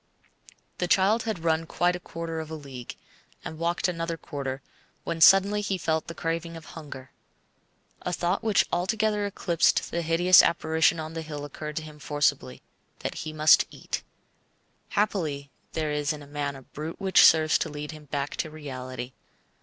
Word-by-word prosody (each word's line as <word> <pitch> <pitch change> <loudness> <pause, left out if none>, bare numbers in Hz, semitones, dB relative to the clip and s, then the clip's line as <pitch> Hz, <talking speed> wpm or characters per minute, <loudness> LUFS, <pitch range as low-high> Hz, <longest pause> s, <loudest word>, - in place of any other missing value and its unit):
The 180 - 0
child 200 +5 +4
had 215 -7 -3
run 165 0 +1
quite 175 +2 +1
a - - -5
quarter 165 -2 -5
of 160 -1 -6
a 160 - -5
league, 135 -5 -8 0.5
and 160 - -6
walked 170 +2 0
another 165 -1 -3
quarter, 135 -3 -5 0.4
when 165 -1 -4
suddenly 195 +4 +7
he 200 -2 -1
felt 160 -2 -1
the 165 - -7
craving 165 0 -3
of 160 - -12
hunger. 145 -5 -9 0.9
A 180 - -3
thought 175 +2 -1
which 220 -3 +3
altogether 210 +3 +1
eclipsed 170 -4 +1
the 170 - -1
hideous 170 +2 +6
apparition 160 0 +2
on 155 0 -5
the 165 - -4
hill 150 -2 -6
occurred 150 +1 -7
to 160 - -3
him 155 -1 -11
forcibly 145 - -1 0.4
that - - -3
he 155 - -5
must 155 0 +6
eat. - - -5 0.9
Happily 155 -10 -1 0.2
there 155 -2 -1
is 150 +1 0
in 145 -2 -8
man 145 -1 -2
a 135 - -11
brute 155 +5 -7
which 190 -2 +5
serves 155 -1 +6
to 160 - -2
lead 150 0 -6
him 155 -1 -11
back 140 0 -3
to 160 - -2
reality. 130 -4 -7
160 Hz, 170 wpm, -27 LUFS, 150-175 Hz, 0.9 s, suddenly